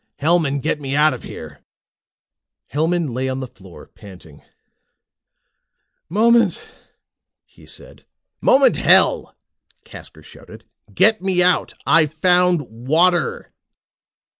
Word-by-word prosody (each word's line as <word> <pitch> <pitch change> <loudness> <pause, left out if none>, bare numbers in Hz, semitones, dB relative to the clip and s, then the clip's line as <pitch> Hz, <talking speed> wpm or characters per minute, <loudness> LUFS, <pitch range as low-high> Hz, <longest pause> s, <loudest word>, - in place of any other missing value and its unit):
Hellman, 150 -3 0
get 150 0 -3
me 135 0 -4
out 150 0 +3
of 125 - -9
here!" - - -11 1.1
Hellman 160 -1 -1
lay 130 +2 -3
on 130 0 -4
the 130 - -5
floor 95 -8 -16
panting. 90 -7 -16 1.7
"Moment," 225 0 +2 0.9
he - - -22
said. - - -16 0.4
"Moment, 270 +1 +3
hell!" - - +2 0.5
Casker - - -14
shouted. - - -16 0.3
"Get 215 +2 +2
me 185 -2 0
out. 180 0 0
I've 155 -3 +2
found 180 0 +2
water!" 155 +8 -1
155 Hz, 105 wpm, -18 LUFS, 130-180 Hz, 1.7 s, out